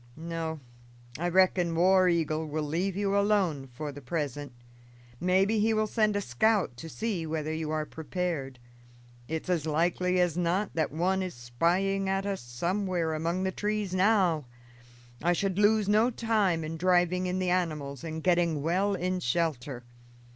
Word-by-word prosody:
No, 165 -1 -4 0.6
I 175 +1 0
reckon 180 -2 +3
War 185 +2 +5
Eagle 160 -2 0
will 155 +1 -2
leave 175 +6 -1
you 200 0 0
alone 195 -9 +1
for 145 +4 -6
the 145 +1 -10
present. 145 0 -3 0.7
Maybe 190 +4 +2
he 220 +1 +2
will 215 0 +2
send 215 -1 +1
a 205 - +1
scout 190 - +1
to 165 +6 -8
see 195 -5 -3
whether 155 0 -2
you 160 -1 -3
are 155 0 -1
prepared; 160 -5 -4 0.7
it's 160 +2 -4
as 170 -4 0
likely 175 +4 +1
as 175 -3 +2
not 180 +4 0
that 160 -1 0
one 185 +5 0
is 185 -1 -4
spying 180 +11 0
at 195 0 0
us 200 -1 -2
somewhere 170 +7 -1
among 170 +4 -1
the 190 - 0
trees 210 -1 -2
now. 185 -6 +3 0.8
I 175 +2 +3
should 195 +1 -1
lose 210 0 +4
no 215 +4 +4
time 215 -8 +1
in 160 +1 -5
driving 180 +1 +2
in 180 +1 -1
the 185 -1 0
animals 150 -7 -2
and 160 -1 -5
getting 170 -5 +2
well 190 +5 +1
in 185 +1 -1
shelter. 140 -4 -1
175 Hz, 160 wpm, -29 LUFS, 155-190 Hz, 0.8 s, War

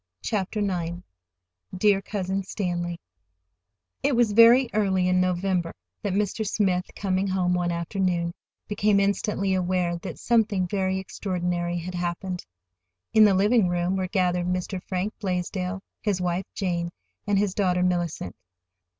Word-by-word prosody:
CHAPTER 210 0 -1
IX 175 -4 -1 0.8
"DEAR 200 0 +4
COUSIN 195 -1 -2
STANLEY" 175 -3 -3 1.0
It 280 -1 +2
was 235 -3 +3
very 230 +4 +7
early 190 -3 +2
in 185 0 +3
November 180 -1 0 0.3
that 200 -3 -2
Mr. 210 +2 0
Smith, 190 -3 0
coming 190 0 0
home 185 -2 +1
one 175 -1 0
afternoon, 170 0 -1 0.3
became 210 0 +2
instantly 200 -1 0
aware 180 -1 0
that 170 - -7
something 215 -5 +2
very 190 0 0
extraordinary 175 -2 -2
had 175 +2 -5
happened. 175 +1 -3 0.7
In 215 -1 +8
the 200 -2 +4
living 205 +1 +4
room 175 +1 0
were 190 -1 -1
gathered 180 -2 +1
Mr. 180 +1 -2
Frank 190 +3 -3
Blaisdell, 185 0 -2 0.2
his 205 -4 0
wife, 180 +1 -1
Jane, 175 -3 -1 0.4
and 200 -1 +3
their 205 - +3
daughter, 180 -2 +1
Mellicent. 175 - -1
185 Hz, 135 wpm, -25 LUFS, 180-200 Hz, 1.0 s, In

